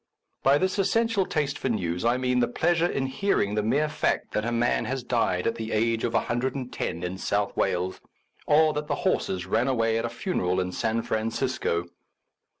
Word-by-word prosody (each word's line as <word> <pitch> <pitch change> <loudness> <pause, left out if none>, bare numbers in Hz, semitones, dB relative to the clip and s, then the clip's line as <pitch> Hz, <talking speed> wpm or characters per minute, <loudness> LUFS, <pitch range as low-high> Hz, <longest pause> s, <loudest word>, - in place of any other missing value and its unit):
By 135 +2 +5
this 185 +4 0
essential 215 0 +2
taste 145 -2 -1
for 130 - -1
news, 90 -6 -1
I 120 +2 +3
mean 125 -1 +1
the 120 - +3
pleasure 170 +6 +2
in 135 -5 -1
hearing 130 - 0
the 105 - +1
mere 140 +8 +1
fact 150 - -1
that 105 - -1
a 115 - -1
man 120 +1 +1
has 130 -1 -3
died 115 -7 0
at 115 - +2
the 110 -1 -5
age 115 +1 +1
of 120 - -1
no 125 +2 -1
in 90 +2 -4
South 100 +1 -1
Wales, 90 +1 -1 0.5
or 155 +1 +5
that 150 0 -3
the - - 0
horses 90 -1 0
ran 115 +7 +1
away 115 -3 +1
at 115 - -2
a - - -2
funeral 105 - -1
in 90 0 -1
San 115 +3 -1
Francisco. 110 -5 -1
120 Hz, 190 wpm, -26 LUFS, 105-140 Hz, 0.5 s, By